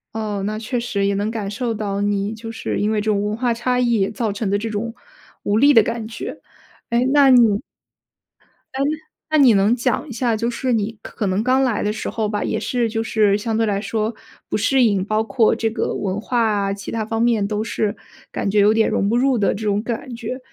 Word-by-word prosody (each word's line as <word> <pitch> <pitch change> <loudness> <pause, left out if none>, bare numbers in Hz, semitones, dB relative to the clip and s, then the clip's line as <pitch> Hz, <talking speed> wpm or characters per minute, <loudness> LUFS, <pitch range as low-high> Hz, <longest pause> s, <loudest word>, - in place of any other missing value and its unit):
哦， 210 -2 -3
那 215 +1 -2
确 230 +3 -3
实 210 -4 -1
也 200 - +1
能 205 +2 -1
感 215 -3 -4
受 235 +2 -2
到 205 -2 -3
你 205 +1 0
就 225 +1 -8
是 225 - -3
因 205 - +1
为 215 -1 0
这 215 +1 0
种 200 -1 +1
文 210 +1 -1
化 240 +1 0
差 250 +2 -1
异 235 -5 +2
造 225 -1 -2
成 205 0 -3
的 200 - +2
这 225 +2 -4
种 225 +2 -4 0.5
无 205 - +1
力 285 +5 +6
的 225 -4 +7
感 230 0 -3
觉。 225 0 -7 0.5
哎， 235 +1 +1
那 285 -1 +6
你 230 -5 +5 1.1
哎， 265 - -1 0.5
那 310 - +4
你 265 -6 +6
能 205 +3 +3
讲 250 +4 -1
一 - - -9
下， 235 -1 0
就 230 +2 -1
是 250 +1 -1
你 220 0 -1
可 210 - -4
能 190 +3 0
刚 260 +2 +3
来 245 -5 0
的 210 - 0
时 220 - -4
候 220 -2 -2
吧， 205 0 -2
也 - - -1
是 240 -2 -1
就 225 0 -2
是 210 -3 +2
相 220 +1 -2
对 225 - +2
来 200 -2 0
说 220 +2 -2 0.4
不 - - 0
适 255 +5 +3
应， 200 -5 +2
包 215 +1 0
括 220 +1 +2
这 225 - 0
个 225 - -2
文 195 0 -2
化 240 +3 -1
啊， 200 -2 0
其 200 -1 -7
他 225 -1 -2
方 225 +1 -2
面 230 -3 +2
都 210 0 -2
是 215 -2 -2 0.4
感 - - -2
觉 205 +1 +2
有 205 +1 +5
点 220 0 +2
融 200 - 0
不 230 - +1
入 260 0 +2
的 205 - +2
这 215 - -6
种 205 0 +1
感 240 +2 -5
觉。 235 +2 -5
220 Hz, 255 characters per minute, -20 LUFS, 205-235 Hz, 1.1 s, 的